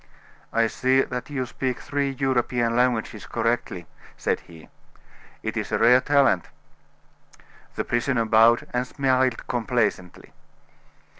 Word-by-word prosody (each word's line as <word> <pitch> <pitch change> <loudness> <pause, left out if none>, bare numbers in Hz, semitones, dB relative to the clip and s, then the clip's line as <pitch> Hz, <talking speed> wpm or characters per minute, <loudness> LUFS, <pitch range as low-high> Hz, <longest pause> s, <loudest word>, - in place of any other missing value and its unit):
"I 115 0 +2
see 130 +3 +2
that 125 +1 -6
you 135 -3 -2
speak 125 0 -3
three 140 -1 -2
European 125 -3 0
languages 120 -4 0
correctly," 115 -6 -2 0.3
said - - -1
he. 80 -2 -15 0.8
"It - - -3
is - - -3
a - - +1
rare 125 +2 +5
talent." 135 -11 +2 1.3
The - - -2
prisoner 120 0 0
bowed, 115 +2 +4
and 125 +1 -1
smiled 130 -3 0
complacently. 110 -6 -2
125 Hz, 120 wpm, -24 LUFS, 115-130 Hz, 1.3 s, rare